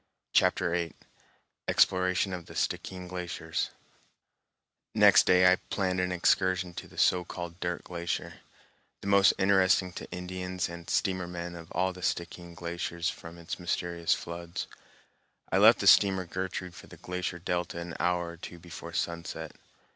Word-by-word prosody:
Chapter 90 -1 +3
VIII 85 -2 -1 0.7
Exploration 90 +1 +3
of 90 -2 -6
the - - -11
Stickeen 90 -1 -2
Glaciers 90 -1 -3 1.3
Next - - +7
day 90 0 +6
I 90 - +4
planned 95 -2 0
an 90 0 0
excursion 90 0 +2
to - - -7
the - - -17
so 90 -1 +4
called 85 0 -7
Dirt 90 -2 -3
Glacier, 85 -1 -4 0.6
the - - -6
most 100 0 +6
interesting 95 -1 +3
to - - -8
Indians 90 0 -4
and 85 0 -9
steamer 95 -2 0
men 85 0 -5
of 85 -1 -10
all 95 +2 +1
the 90 - -11
Stickeen 85 -1 -3
glaciers 85 0 -3
from 85 +1 -11
its 85 -1 -6
mysterious 85 -1 0
floods. 85 0 -6 0.9
I - - +3
left - - +8
the - - -3
steamer 95 -2 +6
Gertrude 90 0 -4
for - - -12
the - - -13
glacier 90 0 -4
delta 90 0 -2
an 85 0 -6
hour 90 0 +1
or 85 - -9
two 85 +1 -9
before 85 0 -9
sunset. 85 -2 -4
90 Hz, 155 wpm, -29 LUFS, 85-90 Hz, 1.3 s, left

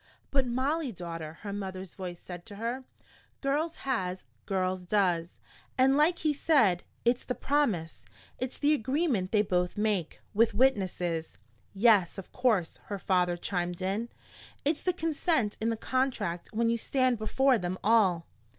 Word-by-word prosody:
"But 270 -2 +2
Molly, 270 +4 0
daughter," 165 -4 -7
her 200 -1 -5
mother's 190 -2 -5
voice 180 -2 -6
said 175 -1 -9
to 205 - -9
her, 235 +5 -3 0.5
"girls 300 +4 0
has 185 -9 -1 0.2
girls 185 -1 0
does. 180 -3 0 0.4
And 265 +1 +5
like 310 +4 +4
he 305 -2 +1
said, 230 - +3 0.2
it's 240 +1 +2
the 250 - -3
promise, 225 - 0 0.3
it's 255 0 -3
the 295 +1 +3
agreement 260 - 0
they 210 -2 +4
both 180 -2 0
make, 205 -6 0
with 220 0 +3
witnesses." 185 -9 +1 0.4
"Yes, 200 -4 +4
of 195 - -8
course," 220 -10 +1
her 205 - -4
father 180 -2 +1
chimed 175 0 -3
in. 205 +5 -1 0.6
"It's 300 +1 +1
the 365 - +1
consent 320 - 0
in 225 - +1
the 225 - -1
contract 220 -9 -1
when 230 +1 +1
you 235 - 0
stand 255 -1 +1
before 255 +3 +3
them 180 +1 -3
all." 195 -6 +4
215 Hz, 150 wpm, -29 LUFS, 180-260 Hz, 0.6 s, And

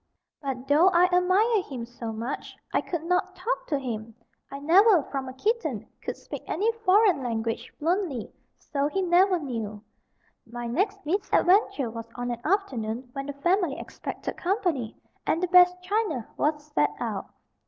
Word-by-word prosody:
But 270 -2 -4
though 300 +6 +5
I 360 0 +4
admired 380 +4 +3
him 250 -4 -5
so 235 -1 -6
much, 230 +5 -5 0.2
I - - +3
could 340 -3 -4
not 365 +2 0
talk 410 +7 -2
to 290 - +1
him. 225 -4 -5 0.3
I 275 - -6
never, 350 +4 +5
from 270 -2 -4
a - - -8
kitten, 445 - -1
could - - -4
speak - - -8
any 425 +6 +1
foreign 410 -7 +3
language 230 -2 -3
fluently. 325 - -1 0.2
So 280 -1 -1
he 380 +6 -1
never 365 +1 +4
knew. 225 -8 -5 0.6
My 240 +1 -6
next 390 - -1
misadventure 365 - +2
was 230 0 -7
on 245 0 -3
an 235 0 -5
afternoon 255 - -1
when 275 0 -5
the 285 - -4
family 345 +1 +1
expected - - -6
company, 350 - -1 0.3
and 325 - +2
the 365 - 0
best 360 0 +6
china 370 - -1
was 295 0 0
set - - +3
out. - - -3
315 Hz, 160 wpm, -27 LUFS, 250-375 Hz, 0.6 s, best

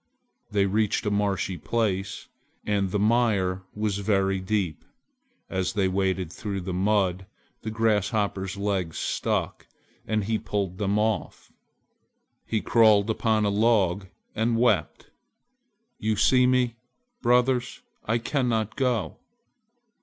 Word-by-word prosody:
They 100 -1 +2
reached 105 +2 0
a 105 - 0
marshy 100 -3 -1
place, 95 -2 -2 0.4
and 100 -2 0
the 105 - -1
mire 105 -4 +2
was 105 -1 -1
very 95 -2 +1
deep. 95 -5 -2 0.6
As 95 +4 -2
they 100 -3 +1
waded 95 -2 -1
through 100 -1 -4
the 90 0 -4
mud, 95 -1 +1 0.3
the 110 - -4
Grasshopper's 105 -3 0
legs 95 -5 -2
stuck, - - -2 0.4
and 110 -1 0
he 110 +2 -1
pulled 100 -3 -3
them 100 0 +1
off! 110 0 -2 1.0
He 110 -2 0
crawled 110 -2 +4
upon 110 -1 +1
a - - +2
log 100 -3 +2 0.3
and 115 +1 0
wept, 115 -4 0 0.9
"You 110 0 0
see 125 +4 +4
me, 125 -2 +1 0.4
brothers, 125 +1 +2 0.2
I 115 +2 +1
cannot 115 -3 -1
go!" 125 -4 -1
105 Hz, 120 wpm, -26 LUFS, 95-110 Hz, 1.0 s, crawled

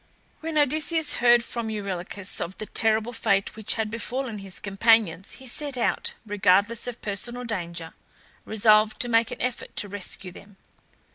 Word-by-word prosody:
When 320 -1 -3
Odysseus 310 +2 +3
heard 240 -1 +6
from 235 -1 -4
Eurylochus 200 -2 -2
of 180 +3 -5
the 215 - -4
terrible 220 +2 +2
fate 200 -4 +1
which 220 -1 -1
had 220 -2 -2
befallen 235 0 -4
his 195 -2 -7
companions 195 -2 +2
he 265 - -12
set 275 +1 -2
out, 240 - -1
regardless 205 +3 +2
of 240 -1 -7
personal 240 +4 -3
danger, 170 -6 -4 0.5
resolved 215 0 +3
to 245 - +2
make 230 -1 +3
an - - -7
effort 250 0 -4
to 205 - -1
rescue 195 -1 -4
them. 200 +2 -15
220 Hz, 155 wpm, -25 LUFS, 200-240 Hz, 0.5 s, heard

